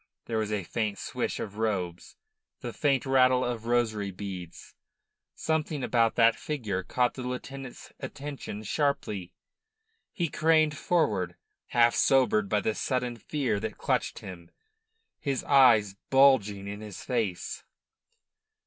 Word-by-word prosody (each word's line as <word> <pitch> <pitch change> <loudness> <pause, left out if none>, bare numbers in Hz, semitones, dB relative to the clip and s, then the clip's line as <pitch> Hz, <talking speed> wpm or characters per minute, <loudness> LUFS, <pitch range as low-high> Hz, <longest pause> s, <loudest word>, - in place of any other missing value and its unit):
There 115 -2 -1
was 110 -1 -2
a 105 -3 -1
faint 105 +2 -2
swish - - -3
of 105 0 -6
robes, 90 -6 -2 0.5
the - - -5
faint 140 -3 +1
rattle 130 -1 +4
of 115 -2 -4
rosary 110 -4 +1
beads. 95 -3 -8 0.6
Something 155 -3 -1
about 115 -2 +2
that 115 -1 +5
figure 110 -11 -3
caught 125 +6 0
the 130 - -7
lieutenant's 125 +1 -7
attention 140 -7 -6
sharply. 105 - -1 0.8
He 175 -5 -1
craned 155 -1 +3
forward, 105 - 0 0.3
half 120 0 +4
sobered 125 -7 +3
by 105 0 +2
the 110 - 0
sudden 125 0 -1
fear 130 -3 -1
that 110 +1 -5
clutched - - -1
him, 85 -2 -10 0.7
his 140 -3 -2
eyes 120 -8 +5 0.2
bulging 130 -8 +4
in 100 +1 -6
his 105 -3 -8
face. 110 -8 -2
115 Hz, 130 wpm, -28 LUFS, 105-135 Hz, 0.8 s, that